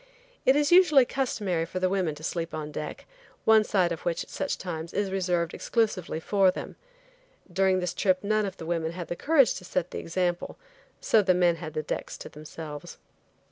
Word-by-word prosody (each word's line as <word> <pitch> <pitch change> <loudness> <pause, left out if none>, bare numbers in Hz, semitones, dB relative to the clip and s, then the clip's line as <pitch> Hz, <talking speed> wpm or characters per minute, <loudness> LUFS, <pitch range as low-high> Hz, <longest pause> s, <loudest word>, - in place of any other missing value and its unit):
It 265 - +7
is 295 +1 +2
usually 330 -8 +7
customary 210 -11 -1
for 170 +3 -4
the 185 - +2
women 185 -5 0
to 155 - -13
sleep 165 -1 -3
on 150 -1 -5
deck, 150 0 -6 0.4
one 220 -1 +6
side 185 -5 +1
of 165 - -4
which, 170 -1 -1
at - - -16
such - - -2
times, 165 -2 -6
is 200 -2 0
reserved 180 -3 0
exclusively 205 -8 -1
for 195 +3 +3
them. 185 - -5 0.8
During 190 -1 +3
this 180 -1 -2
trip 185 -1 +1
none 215 0 +1
of 190 - -7
the 160 - -8
women 165 -1 -1
had 175 -1 -6
the 175 - -2
courage 280 - +4
to - - -15
set 180 -1 -2
the - - -4
example, 175 0 -2 0.4
so 220 - +4
the 185 -2 +3
men 175 -2 +3
had 155 -1 -7
the 155 - -1
decks - - -4
to - - -9
themselves. 155 +1 -9
180 Hz, 200 wpm, -27 LUFS, 165-205 Hz, 0.8 s, It